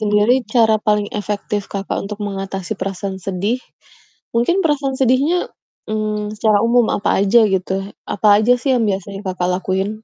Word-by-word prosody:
sendiri 210 +2 +3 0.2
cara 225 -2 +5
paling 210 -1 +2
efektif 205 0 -3
Kakak 195 -1 -3
untuk 210 +1 -6
mengatasi 195 0 -4
perasaan 195 0 -3
sedih 195 +6 -2 0.7
mungkin 345 +12 +2
perasaan 285 -3 +1
sedihnya, 270 +8 +2 0.4
mmm, 215 -1 -2
secara 210 -1 +3
umum 240 -1 +4
apa 205 - -1
aja 205 +4 +5
gitu, 190 -1 -1 0.4
apa 210 - -1
aja 230 +3 +4
sih 270 - 0
yang 230 - +1
biasanya 195 0 -3
Kakak 180 -1 -1
lakuin? 190 +2 -1
210 Hz, 150 wpm, -19 LUFS, 195-235 Hz, 0.7 s, cara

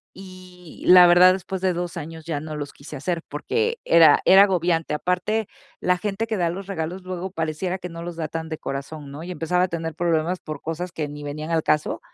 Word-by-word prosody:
Y 185 -2 -13
la 180 -1 +9
verdad, 180 +1 +7
después 190 0 -5
de 185 -1 +1
2 175 0 -4
años 160 0 -7
ya 155 -3 -3
no 155 +1 -7
los 145 -1 -5
quise 145 +2 -11
hacer, 165 +4 -2
porque 455 - -1
era 165 -3 +6
era 195 +1 +8
agobiante. 175 -5 +1
Aparte, 180 +7 -1 0.3
la 180 0 +2
gente 205 +4 -3
que 220 -2 -2
da 170 -2 +1
los 190 +2 -7
regalos 180 -1 -4
luego 185 0 -5
pareciera 165 +3 -3
que 180 - -7
no 165 0 -8
los 175 -1 -6
da 160 -2 -3
tan 160 +1 -5
de 155 -1 -6
corazón, 140 +1 -6
¿no? 145 +3 -8
Y 180 - -6
empezaba 180 +1 0
a - - +2
tener 165 -2 -4
problemas 170 +1 0
por 155 -2 -7
cosas 165 +3 -4
que 155 -3 -3
ni 145 0 -9
venían 150 +2 -5
al 165 -1 +1
caso. 150 0 0
170 Hz, 225 wpm, -23 LUFS, 155-185 Hz, 0.3 s, la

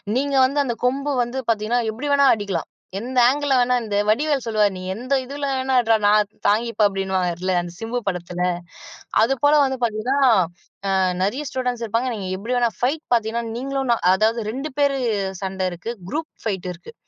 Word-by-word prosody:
நீங்க 280 +1 0
வந்து 280 +2 0
அந்த 240 -3 -1
கொம்பு 275 +3 0
வந்து 240 +3 -5
பார்த்தீங்கன்னா, 225 +2 +1
எப்படி 240 +7 -7
வேண்டுமானாலும் 280 -3 +5
அடிக்கலாம். 195 -5 -3 0.3
எந்த 250 +3 -5
ஆங்கில்ல 285 0 0
வேணாலும். 245 -1 +2
இந்த 205 -1 -1
வடிவேல் 280 +3 +1
சொல்லுவார் 210 -3 +2
"நீ 185 - -7
எந்த 250 +6 -3
இதில 280 +2 -5
வேணாலும் 260 0 +1
அடிடா 225 -2 +3
நான் 210 0 +4 0.2
தாங்கிப்பேன்." 220 +1 +2
அப்படினுவார்ல 185 -2 -1
அந்த 175 0 -7
சிம்பு 230 +2 -2
படத்தில. 180 -1 -3 0.8
அதுபோல 280 +5 +3
வந்து 265 -1 -2
பார்த்தீங்கன்னா, 235 +4 0 0.7
ஆ - - +1 0.3
நெறைய 235 +10 0
ஸ்டூடண்ட்ஸ் 250 -2 -2
இருப்பாங்க. 230 +4 0
நீங்க 195 -3 -5
எப்படி 235 +5 -3
வேணா 240 -1 +3
ஃபைட் 285 +6 0
பார்த்தீங்கன்னா, 230 0 0
நீங்களும் 270 0 -2
நான் 180 - -3
அதாவது 220 +3 +1
2 275 +4 -5
பேர் 280 -1 +3 0.5
சண்ட 190 -1 -2
இருக்கு, 180 +7 -5 0.2
குரூப் 315 +1 -3
ஃபைட் 190 -5 -2
இருக்கு. 180 - -13
235 Hz, 170 wpm, -22 LUFS, 205-265 Hz, 0.8 s, வேண்டுமானாலும்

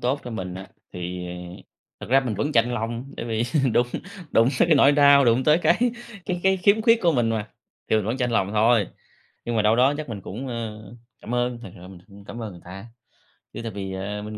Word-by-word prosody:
tốt 130 +3 0
cho 120 - -6
mình 95 -5 -5
á, 95 +1 -9 0.2
thì 90 0 -5 0.7
thực - - -8
ra 135 +1 +5
mình 120 -5 -3
vẫn 145 +9 -2
chạnh 120 +1 +2
lòng, 120 +3 -4
bởi 115 - -5
vì 110 0 -1 0.3
đụng 120 - +3 0.4
đụng 115 +2 +4
tới - - +3
cái 160 - +6
nỗi 140 +1 +6
đau, 140 -1 +6
đụng 120 +2 +3
tới 155 +2 +5
cái 170 +2 +2 0.5
cái 180 -1 -2
cái 190 0 +3
khiếm 200 +4 +3
khuyết 230 0 +4
của 170 -2 +4
mình 120 -4 +1
mà, 110 -1 -2 0.4
thì 110 - +3
mình 105 - 0
vẫn 115 +5 -2
chạnh 125 -2 -1
lòng 100 -4 +1
thôi. 110 -1 +3 0.6
Nhưng 120 -1 -2
mà 110 - +2
đâu 110 +2 +3
đó 135 +4 +4
chắc 150 -3 -6
mình 105 -4 -6
cũng, 115 +9 -7
ơ, 110 -3 -5 0.4
cảm 120 - -5
ơn, 120 0 -1
thực 115 - -9
sự 90 +1 -12
mình 95 -2 -12
cũng 100 0 -15
cảm 115 +3 -8
ơn 105 -3 -6
người 85 - -13
ta. 95 +4 -10 0.7
Chứ - - -6
tại 115 - -4
vì, 95 -1 -6
ờ, 100 +2 -4
mình 105 0 -7
115 Hz, 240 wpm, -24 LUFS, 105-135 Hz, 0.7 s, cái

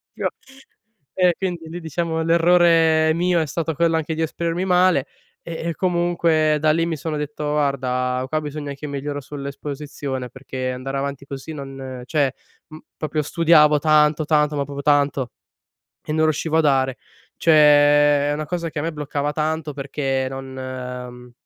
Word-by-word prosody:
io - - -1 0.8
e 180 -2 +3
quindi, 175 -4 -4
lì 170 +2 -6
diciamo, 160 +1 -2
l'errore 165 -1 +4
mio 175 +1 +1
è - - 0
stato 160 +1 -3
quello 165 +1 +2
anche 160 0 -2
di 160 - -3
esprimermi 170 +3 -2
male 180 -6 +3 0.4
e 170 0 -5
e - - -7
comunque 170 -3 +2
da 155 0 +4
lì, 165 +2 +1
mi 170 -1 -2
sono 155 +1 -3
detto: 150 0 -5
"Guarda, 130 -3 0
qua 155 +1 0
bisogna 145 -1 -5
che 145 +2 -8
miglioro 145 +1 -4
sull'esposizione, 140 -1 -6
perché 130 -1 -5
andare 130 +2 -4
avanti 140 0 -4
così, 140 +2 -7
non", 135 -3 -7
cioè 140 -2 +1 0.4
m 155 - -10 0.2
proprio 155 0 -2
studiavo 155 -1 +4
tanto, 150 0 +3
tanto, 150 -1 +2
ma 140 - 0
proprio 140 0 -6
tanto 145 -3 +2 0.7
e - - -4
non 155 0 +2
riuscivo 155 +1 0
a - - +5
dare. 135 -3 +2 0.4
Cioè 165 - +3 0.8
è - - +1
una 155 +1 -3
cosa 170 +1 -3
che 160 - -9
a - - -1
me 165 0 -2
bloccava 145 0 -2
tanto, 155 0 -2
perché 135 -1 -2
non 135 0 -7
uhm, 125 -1 -7
150 Hz, 165 wpm, -21 LUFS, 140-160 Hz, 0.8 s, a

